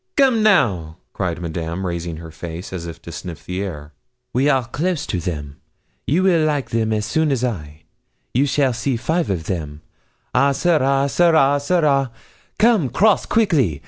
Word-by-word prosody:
'Come, 260 -5 +4
now!' 105 - +2 0.2
cried 90 -3 -2
Madame, 85 +2 -4
raising 85 -2 -4
her 80 0 -9
face, 85 +3 -7
as 85 -2 -5
if 85 - -8
to - - -8
sniff 85 -4 -8
the 90 +1 -3
air; 75 -6 -7 0.4
'we 135 +4 +2
are 130 -4 +2
close 160 +5 -2
to 90 - -2
them. 75 -4 -5 0.5
You 170 +7 +2
will 175 -4 +4
like 145 -6 -1
them 110 -1 +1
soon 150 +8 0
as 130 -3 0
I. 80 -10 -4 0.5
You 135 +4 +2
shall 135 -2 +2
see 120 +2 -1
five 160 +8 -1
of 90 -5 -1
them. 80 -4 -4 0.5
Ah, 140 +3 +3
ça 175 +6 +1
ira, 135 +1 +2
ça 175 +5 +2
ira, 145 -4 +4
ça 145 +6 0
ira! 140 -5 +2 0.5
Come 215 - +3
cross 205 - +3
quickily! 145 - +2
120 Hz, 175 wpm, -20 LUFS, -, 0.5 s, Come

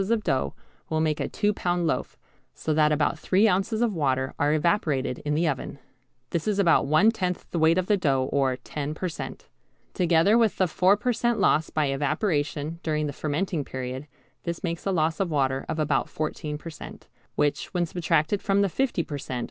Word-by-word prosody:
of 230 -2 +1
dough 100 - 0 0.3
will 160 - 0
make 155 -1 0
a - - -1
two 210 0 0
pound 175 -2 -1
loaf, - - -2 0.4
so 155 - -2
that 150 0 +4
about 150 +1 +1
three 195 +7 +3
ounces 210 +4 +1
of 230 -3 +1
water 130 -5 0
are 145 +1 +3
evaporated 155 -5 +1
in 150 0 -2
the 165 +2 +2
oven, 140 -1 -3 0.5
This 170 +1 -2
is 210 -2 +1
about 170 -7 +4
one 155 +10 +5
tenth 180 -5 -3
the 170 - -1
weight 160 +2 +4
of 185 - +1
the 210 +1 +2
dough 135 -7 +1
or 135 -2 +2
10 150 +3 -5
per 185 - -2
cent. 170 - -7 0.5
Together 180 +5 +4
with 225 -3 +2
the 185 - +3
four 185 +5 +3
per 245 +3 0
cent. 240 0 0
loss 155 0 +3
by 155 -1 0
evaporation 150 +2 -1
during 155 -2 -1
the 145 - -3
fermenting 155 +2 -2
period, 130 +2 -6 0.3
this 170 -1 -5
makes 170 +1 -3
a - - +2
loss 160 -2 +1
of 195 -3 0
water 135 -3 0
of - - -2
about 145 -4 0
14 150 -1 -4
per 165 +2 -8
cent., 155 - -11 0.3
which, 145 -1 0
when 175 -1 +2
subtracted 165 +2 0
from 200 0 +2
the 200 - +1
50 245 -4 0
per 145 -2 -6
cent. 130 -2 -4
160 Hz, 205 wpm, -26 LUFS, 145-185 Hz, 0.5 s, one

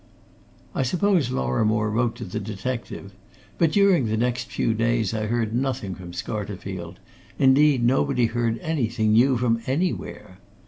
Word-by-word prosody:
I - - -1
suppose 175 +1 +1
Lorrimore 105 - 0
wrote 115 +1 0
to - - -7
the 100 +3 -4
detective. 105 0 -5 0.5
But 165 -2 +3
during 195 - +4
the 110 0 -1
next 125 +1 -1
few 115 - 0
days 115 -1 0
I 110 -1 -2
heard 115 -1 -1
nothing 125 -5 -2
from 90 -1 -9
Scarterfield; 95 -3 -5 0.4
indeed 135 -1 +4
nobody 130 0 +2
heard 115 0 -1
anything 115 -8 0
new 125 +3 +4
from 115 -1 +1
anywhere. 135 - -3
115 Hz, 140 wpm, -24 LUFS, 105-130 Hz, 0.5 s, during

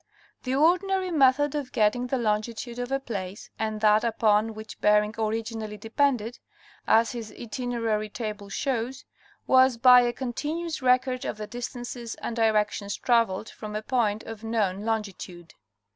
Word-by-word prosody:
The 255 +1 0
ordinary 365 +5 +2
method 290 -1 +3
of 285 -4 -4
getting 230 +3 +1
the 265 - 0
longitude 230 +1 -2
of 245 +1 -4
a 270 - +1
place, 200 -6 -6
and 215 -1 -2
that 215 0 +4
upon 220 -1 +2
which 215 0 -10
Bering 210 0 +3
originally 220 -1 -3
depended, 230 +1 0 0.5
as 225 +1 +4
his 230 -3 -6
itinerary 230 -3 -2
table 210 -2 -6
shows, 255 +2 -2 0.4
was 260 -1 +5
by 250 +1 +8
a 240 0 +1
continuous 300 +7 -4
record 255 0 +2
of - - -4
the 215 - -5
distances 240 0 -6
and 235 - -5
directions 210 -2 +1
traveled 230 -3 +1
from 210 -1 -8
a 215 - -3
point 220 -4 0
of 225 -1 -9
known 210 -3 -1
longitude. 195 -6 -4
230 Hz, 145 wpm, -26 LUFS, 215-255 Hz, 0.5 s, by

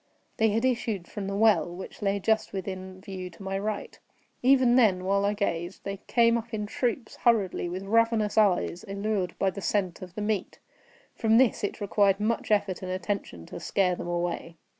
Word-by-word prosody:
They 220 0 +4
had 225 +4 +1
issued 225 -7 -1
from 200 -2 -5
the 195 - -3
well, 200 -6 +4
which 190 - -9
lay 200 0 +1
just 220 +2 +1
within 185 -1 -6
view 190 -3 -6
to 175 +3 -13
my 195 0 -2
right. 210 +1 -4 0.4
Even 255 -1 +5
then, 195 -7 +4
while 200 +1 +2
I 205 +1 +1
gazed, 175 -3 -3
they 200 0 -4
came 235 -1 +4
up 230 0 -7
in 210 -1 -2
troops, 235 +2 -2
hurriedly, 205 -7 +2
with 185 +2 -5
ravenous 225 0 +2
eyes, 195 -4 +2
allured 200 -2 -2
by 195 - +1
the 200 - -7
scent 185 -3 -1
of 180 -1 -9
the 210 - -4
meat. 210 -3 -2 0.6
From 225 0 +3
this 250 -4 +3
it 205 - -2
required 200 -1 +2
much 225 +2 -1
effort 200 -3 +1
and 185 - -5
attention 185 - -4
to - - -8
scare 185 -2 +1
them 175 - -5
away. 175 -1 -2
200 Hz, 190 wpm, -27 LUFS, 185-220 Hz, 0.6 s, Even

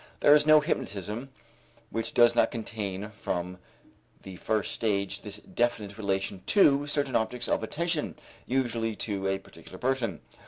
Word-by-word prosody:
There 145 - +7
is 150 0 +5
no 155 0 +8
hypnotism 110 - -3 0.6
which 115 - -3
does 120 -1 +6
not - - +4
contain 105 -3 -5
from 90 -3 -4 0.6
the 95 -2 -9
first 110 +2 -1
stage 100 -3 -1
this 105 -1 -6
definite 105 -2 -2
relation 95 -2 -2
to 145 -8 +5
certain 145 -3 0
objects 120 +2 0
of - - +1
attention, 165 +7 -2 0.3
usually 115 -4 0
to 100 -3 -2
a 95 0 +1
particular - - -13
person. 125 - -1
110 Hz, 145 wpm, -28 LUFS, 100-130 Hz, 0.6 s, no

